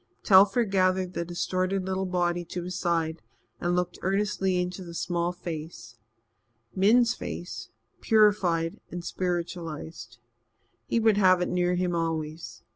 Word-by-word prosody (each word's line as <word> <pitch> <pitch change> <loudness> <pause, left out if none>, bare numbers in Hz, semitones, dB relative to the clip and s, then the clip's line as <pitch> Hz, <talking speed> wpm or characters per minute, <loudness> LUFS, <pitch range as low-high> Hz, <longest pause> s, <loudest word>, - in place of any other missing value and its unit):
Telford 200 +3 +5
gathered 185 -1 +1
the 170 - -2
distorted 185 +2 -1
little 190 0 -2
body 175 -1 0
to 175 +1 -5
his 180 +1 -5
side 165 -3 -1 0.4
and 175 0 0
looked 180 0 -2
earnestly 195 -1 0
into 180 +1 -3
the 170 -1 -9
small 175 0 -1
face 155 -9 -8 0.8
Min's 230 +5 +4
face, 175 - -7 0.3
purified 200 -7 +2
and 175 0 -6
spiritualized. 170 -6 -4 0.7
He 235 - +1
would 220 -2 +3
have 185 -3 +5
it - - -2
near 180 0 +1
him 180 0 0
always. 165 -1 -3
180 Hz, 130 wpm, -27 LUFS, 170-190 Hz, 0.8 s, Telford